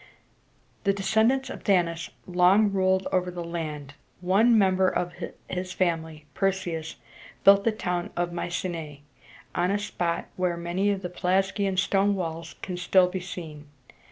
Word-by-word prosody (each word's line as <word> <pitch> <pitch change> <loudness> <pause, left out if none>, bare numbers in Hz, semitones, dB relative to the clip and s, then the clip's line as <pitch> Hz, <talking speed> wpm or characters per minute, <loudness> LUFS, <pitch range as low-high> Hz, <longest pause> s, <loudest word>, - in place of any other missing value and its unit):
The 200 - +3
descendants 220 +7 +2
of - - -8
Danaus 170 -4 +1 0.2
long 185 +4 +4
ruled 190 -1 +1
over 180 -1 +1
the 175 -1 -5
land; 155 -4 -5 0.3
and 180 - -11
one 220 +5 +5
member 190 -2 +3
of 175 0 -2 0.3
his 185 0 -4
family, 160 -4 -1
Per´seus, 175 -5 -2 0.5
built 200 0 +7
the 230 - +4
town 180 -5 -3
of 175 0 -1
My 175 - -3
ce´næ 165 -5 -4 0.5
on 175 +1 +1
a 200 - +2
spot 175 -4 -2
where 180 -2 0
many 175 +4 0
of 200 -1 -1
the 180 - -3
Pelasgian 190 +2 0
stone 195 +1 +2
walls 165 -3 -5
can 180 -2 -4
still 180 0 +4
be 185 +1 -3
seen. 160 -5 -8
180 Hz, 155 wpm, -26 LUFS, 170-195 Hz, 0.5 s, built